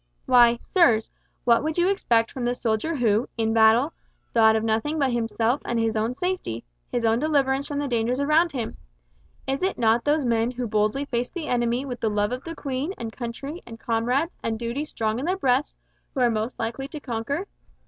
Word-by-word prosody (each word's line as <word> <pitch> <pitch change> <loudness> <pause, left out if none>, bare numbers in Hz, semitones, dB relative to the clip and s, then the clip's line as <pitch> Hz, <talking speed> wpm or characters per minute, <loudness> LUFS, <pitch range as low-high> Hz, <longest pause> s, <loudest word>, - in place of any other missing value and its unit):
Why, 240 -2 +6
sirs, 235 - +3 0.3
what 235 +1 +4
would 315 +1 -2
you 350 +1 +3
expect 235 -13 +2
from 260 - -5
the 245 +1 0
soldier 235 +8 -1
who, 230 -3 +1
in 225 -1 +1
battle, 225 +7 +5 0.4
thought 220 -1 +5
of 220 - 0
nothing 225 +8 0
but 275 -4 +2
himself 235 +2 0
and 235 - -2
his 225 0 0
own 220 +3 0
safety, 360 - -3 0.3
his 235 - 0
own 225 +1 +3
deliverance 280 -2 +1
from 290 - -4
the 290 0 -1
dangers 240 +1 0
around 310 +4 +3
him? 240 -5 -4 0.7
Is 270 +1 -2
it 380 +1 0
not 230 0 +3
those 295 -1 +1
men 230 -1 +2
who 250 0 -4
boldly 215 +5 0
face 245 -2 -2
the 345 -4 -5
enemy 240 0 0
with 250 -3 -5
the 220 - 0
love 205 +1 0
of 255 +1 -4
Queen 280 +6 -3
and 225 -2 -6
country 275 +7 -6
and 225 -1 -11
comrades 245 +8 0
and 225 -1 -2
duty 240 +6 -3
strong 220 -5 -2
in 270 - -3
their 370 +2 0
breasts, 265 -4 +1 0.4
who 265 - 0
are 240 -1 +4
most 220 +2 -2
likely 270 +4 -3
to 305 - -7
conquer? 275 - -3
245 Hz, 200 wpm, -25 LUFS, 225-285 Hz, 0.7 s, Why